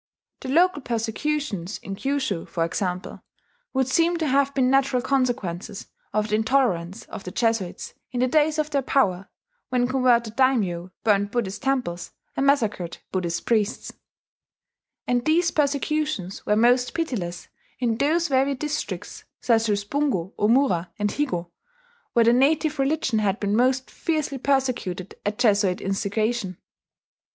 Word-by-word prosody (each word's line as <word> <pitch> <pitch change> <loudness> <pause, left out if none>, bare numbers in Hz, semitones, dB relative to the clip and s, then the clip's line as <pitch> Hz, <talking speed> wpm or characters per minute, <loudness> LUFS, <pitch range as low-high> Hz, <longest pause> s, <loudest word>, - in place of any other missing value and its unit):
The - - -7
local 340 +2 +3
persecutions 230 - -2
in 195 - -7
Kyushu, 265 -8 -2
for 165 -1 -1
example, 180 +1 -3 0.5
would 265 -2 +1
seem 335 +6 +2
to 325 - -1
have 280 0 +2
been 260 -2 +3
natural 270 -1 +3
consequences 235 -9 -1 0.3
of 215 +1 0
the 210 - +2
intolerance 220 -6 +1
of 215 - -9
the - - -6
Jesuits 225 -3 -1 0.2
in 250 - -4
the 255 - +3
days 305 +3 +2
of 305 0 -1
their 280 - +1
power, 195 -9 +1 0.4
when 245 -1 +1
converted 245 -3 +2
daimyo 200 -10 +1
burned 205 -2 +2
Buddhist 210 -4 -2
temples 250 -11 -2 0.2
and 275 - +1
massacred 215 -11 +1
Buddhist 170 -3 -2
priests; 220 -1 0 1.1
and 245 -1 +1
these 335 +4 +3
persecutions 290 - -1
were 210 - +3
most 245 +3 +3
pitiless 210 - -3 0.3
in 235 -3 0
those 330 +4 +2
very 275 0 +2
districts 300 +3 -4
such 225 -2 +2
as 205 -1 +1
Bungo, 205 - -1
Omura, 210 -5 +2
and 205 -1 0
Higo 175 -13 -2 0.6
where 235 -2 +4
the 235 - +5
native 300 +3 +2
religion 270 -4 +1
had 205 -1 0
been 205 0 0
most 260 +2 +2
fiercely 305 -4 -2
persecuted 245 -9 -1
at 210 0 -2
Jesuit 205 -6 +3
instigation. 200 0 -1
240 Hz, 140 wpm, -24 LUFS, 200-275 Hz, 1.1 s, the